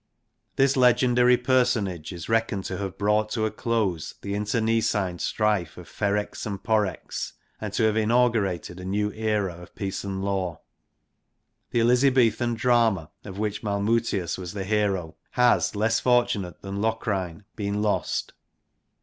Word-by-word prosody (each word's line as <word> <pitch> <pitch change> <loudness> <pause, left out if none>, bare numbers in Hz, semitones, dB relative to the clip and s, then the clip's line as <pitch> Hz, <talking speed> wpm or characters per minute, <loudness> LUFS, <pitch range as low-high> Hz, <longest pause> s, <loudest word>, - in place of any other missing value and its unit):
This 135 +1 +3
legendary 125 -1 +4
personage 120 - +1
is 85 -3 -7
reckoned 115 -4 0
to 90 - -3
have 95 -1 -4
brought 105 +1 +2
to 110 -2 0
a 110 - -1
close 105 -9 -1
the 100 - -3
internecine 105 -3 0
strife 105 -7 0
of - - -10
Ferrex 105 0 -2
and 100 -2 -5
Porrex, 110 -3 -1 0.3
and 105 -2 -4
to 115 - +1
have 110 -1 +3
inaugurated 110 -6 +1
a - - -8
new 105 +2 -1
era 105 -4 -1
of 90 - -14
peace 100 -3 -4
and 95 -1 -4
law. 95 -4 -2 1.1
The 120 - +1
Elizabethan 120 -1 +3
drama, 115 -8 +2
of 95 -2 -8
which 105 0 -2
Malmutius 100 -3 0
was 90 -2 -6
the 100 -2 -3
hero, 95 -6 0 0.2
has 125 -3 +3
less 110 +2 +2
fortunate 120 -8 +1
than 100 0 -4
Locrine 105 -5 -2
been 105 0 -2
lost. 105 - -1
105 Hz, 140 wpm, -25 LUFS, 95-115 Hz, 1.1 s, legendary